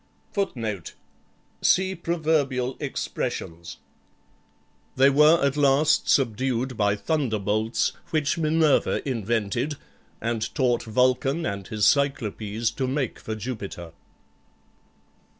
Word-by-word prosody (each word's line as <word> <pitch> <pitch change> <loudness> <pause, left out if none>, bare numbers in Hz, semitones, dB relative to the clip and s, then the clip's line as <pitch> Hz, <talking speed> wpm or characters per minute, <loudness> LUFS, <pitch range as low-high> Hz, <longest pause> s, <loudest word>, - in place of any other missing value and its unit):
[Footnote: 115 - -3 0.7
See 190 +1 +3
Proverbial 155 -7 0
Expressions.] 85 +1 -4 1.2
They 135 +2 +5
were 150 +4 +6
at 140 0 +1
last 145 +1 +3
subdued 130 0 +1
by 105 -1 +2
thunderbolts, 110 -5 0 0.2
which 155 -3 +1
Minerva 155 -3 +2
invented, 115 +4 -1 0.4
and 115 -1 -2
taught 125 -4 +2
Vulcan 130 +7 +1
and 100 -2 -4
his 105 -2 0
Cyclopes 115 -5 +1
to 130 - -2
make 130 -2 -2
for 110 - -5
Jupiter. 105 -7 -6
130 Hz, 95 wpm, -25 LUFS, 110-145 Hz, 1.2 s, were